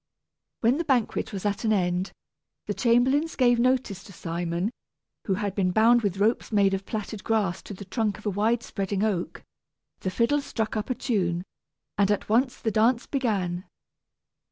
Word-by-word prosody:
When 240 +4 +3
the - - +1
banquet 260 -7 0
was 195 -1 -5
at 205 +1 -1
an 220 - +2
end, 180 -2 +1 0.5
the - - -2
chamberlains 265 +6 +2
gave 245 -2 +4
notice 250 -6 +1
to - - -12
Simon, 170 +3 -2 0.6
who 195 - +2
had 200 -1 -2
been 195 -2 +1
bound 230 +5 +5
with 200 -3 -1
ropes 215 +5 +1
made 200 -2 +3
of 195 0 -3
plaited 215 -1 -5
grass 205 -5 0
to 205 - -8
the 200 - -9
trunk 210 0 -1
of 215 - -15
a 205 - +1
wide 225 +4 +1
spreading 195 0 -2
oak; 200 -5 -2 0.6
the 185 - -2
fiddle 235 +9 +1
struck 225 -5 -3
up 215 +2 -3
a 255 - 0
tune, 180 -9 -1 0.6
and 200 -1 +4
at 205 - 0
once 250 +4 +2
the 220 - -1
dance 230 +3 +3
began. 195 -10 -1
210 Hz, 180 wpm, -26 LUFS, 195-235 Hz, 0.6 s, bound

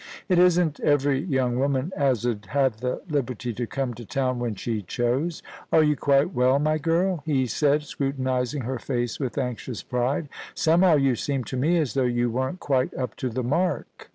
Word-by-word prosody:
' - - -21
It 180 -2 +4
isn't 175 -4 +3
every 145 -2 +2
young 130 -7 0
woman 140 +4 0
as 130 -5 +1
'ud 110 -4 -2
have 135 -5 +1
the 125 +2 -3
liberty 125 -6 -2
to 120 +2 -3
come 135 -1 -2
to 120 - -9
town 130 +2 -1
when 120 -3 -2
she 110 +2 -3
chose. 125 - -1 0.3
Are 160 - +5
you 150 -1 +3
quite 140 +5 +2
well, 130 +2 +3
my 155 +2 +1
girl 170 +2 +1
?* - - -37
he 135 -4 +2
said, 145 +5 +1
scrutinising 130 -2 -2
her 130 +1 -3
face 120 -3 -2
with 130 -4 -3
anxious 125 -2 -3
pride. 125 +5 -1 0.2
* - - -19
Somehow 170 +1 +4
you 135 -3 +3
seem 135 +2 -2
to 130 - -6
me 155 +7 +2
as 150 -6 0
though 135 - +1
you 120 -1 +1
weren't 130 +9 -2
quite 130 -3 0
up 125 -4 -3
to 130 - -2
the 125 +2 -3
mark.' 160 +6 -2
135 Hz, 205 wpm, -25 LUFS, 125-150 Hz, 0.3 s, Are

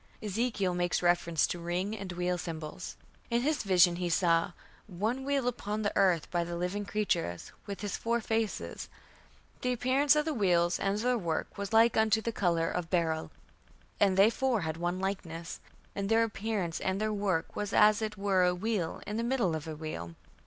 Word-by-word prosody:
Ezekiel 210 -3 -1
makes 175 0 0
reference 175 -2 +3
to 175 - -4
"ring" 180 +5 -2
and 195 -3 -6
"wheel" 180 0 0
symbols. 165 0 -6 0.3
In 235 +1 +1
his 300 -1 +1
vision 180 -3 +4
he 175 -1 -2
saw 170 +1 +2 0.3
"one 215 +7 -2
wheel 275 -2 0
upon 215 -3 -2
the 205 - -1
earth 180 -5 +3
by 175 -1 +1
the 170 0 -5
living 185 +4 -2
creatures, 180 - -2 0.2
with 200 +1 -5
his 205 -1 -3
four 235 +1 0
faces. 220 -1 -2 0.7
The 250 - 0
appearance 260 +5 +3
of 300 0 +2
the 315 - -1
wheels 175 -6 +2
and 195 +1 0
their 245 +2 +1
work 165 -4 -3
was 200 -1 -5
like 225 +1 +5
unto 220 0 +4
the 230 +1 -2
colour 170 -6 +1
of 175 -2 -3
beryl; 160 -3 0 0.7
and 195 -2 +3
they 200 +4 +6
four 255 -4 0
had 160 -2 -2
one 175 +2 -2
likeness; 170 -4 -4 0.4
and 200 0 -2
their 225 0 +4
appearance 210 -6 -2
and 190 +1 -1
their 215 0 0
work 195 -5 -1
was 205 0 -3
as 210 0 +5
it 215 -1 -3
were 195 -2 +2
a 180 0 +3
wheel 190 -3 -2
in 210 - -4
the 230 - -1
middle 235 -8 +1
of 160 0 -5
a 160 - -5
wheel.... 85 - -6
195 Hz, 190 wpm, -30 LUFS, 175-220 Hz, 0.7 s, they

